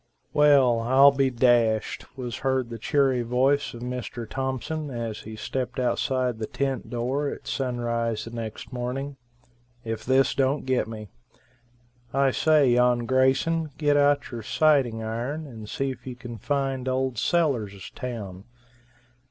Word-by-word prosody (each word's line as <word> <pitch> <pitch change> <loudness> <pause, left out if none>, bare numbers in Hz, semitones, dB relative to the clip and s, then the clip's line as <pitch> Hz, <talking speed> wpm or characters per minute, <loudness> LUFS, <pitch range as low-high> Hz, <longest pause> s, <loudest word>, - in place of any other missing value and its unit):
"Well, 140 -5 +5
I'll 130 +4 +6
be 135 -1 +2
dashed," 120 -3 +2
was 120 -5 -4
heard 130 -2 -1
the 115 - -6
cheery 135 +1 +2
voice 130 +4 +1
of 120 - -8
Mr. 125 -2 -5
Thompson, 135 +5 -3
as 115 -4 -4
he 110 0 -9
stepped 130 +4 -4
outside 125 -1 0
the 110 - -3
tent 135 -4 -2
door 130 +5 -1
at - - -8
sunrise 115 -4 -2
next 115 +2 -6
morning. 130 +3 -4 0.7
"If 110 -1 -4
this 130 +2 +3
don't 135 +1 0
get 130 -4 +1
me. 110 -2 -8 1.1
I 135 -1 +3
say, 150 -2 +4
yon 120 0 +3
Grayson, 135 +6 +2
get 145 -2 +2
out 145 0 +3
your 120 -2 -5
sighting 125 -2 +2
iron 120 +8 -3
and 110 -6 -10
see 135 0 -1
if 130 - -11
you 125 - -5
can 120 -2 -9
find 135 +1 -1
old 130 -2 -1
Sellers' 115 - 0
town. 105 -6 -6
125 Hz, 145 wpm, -26 LUFS, 115-135 Hz, 1.1 s, I'll